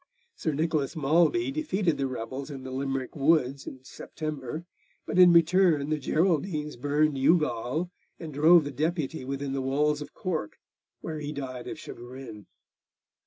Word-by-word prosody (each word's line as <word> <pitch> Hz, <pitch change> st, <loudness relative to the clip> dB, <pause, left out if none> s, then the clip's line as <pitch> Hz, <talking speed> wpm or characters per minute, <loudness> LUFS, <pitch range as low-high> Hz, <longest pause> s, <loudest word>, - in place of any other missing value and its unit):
Sir 155 Hz, -, -2 dB
Nicholas 155 Hz, 0 st, -1 dB
Malby 170 Hz, -, +2 dB
defeated 210 Hz, -, 0 dB
the 135 Hz, -, +1 dB
rebels 130 Hz, +3 st, -5 dB
in 135 Hz, -3 st, -7 dB
the 130 Hz, -, -7 dB
Limerick 135 Hz, -1 st, -3 dB
woods 140 Hz, -2 st, +2 dB
in 130 Hz, -1 st, -9 dB
September, 155 Hz, +2 st, -6 dB, 0.4 s
but -, -, -1 dB
in 180 Hz, -1 st, +9 dB
return 170 Hz, -3 st, +4 dB
the 155 Hz, -, +1 dB
Geraldines 155 Hz, 0 st, 0 dB
burned 145 Hz, +2 st, +1 dB
Youghal 150 Hz, +1 st, +1 dB, 0.3 s
and 160 Hz, -3 st, -7 dB
drove 160 Hz, +4 st, +6 dB
the 145 Hz, -, -5 dB
Deputy 160 Hz, 0 st, -2 dB
within 135 Hz, +1 st, -4 dB
the 135 Hz, -, -1 dB
walls 145 Hz, +3 st, +1 dB
of 145 Hz, 0 st, -9 dB
Cork, 160 Hz, -, -3 dB, 0.4 s
where 155 Hz, -1 st, -5 dB
he 150 Hz, 0 st, -4 dB
died 130 Hz, -4 st, -6 dB
of -, -, -5 dB
chagrin. 120 Hz, -4 st, -10 dB
150 Hz, 150 wpm, -27 LUFS, 135-165 Hz, 0.4 s, in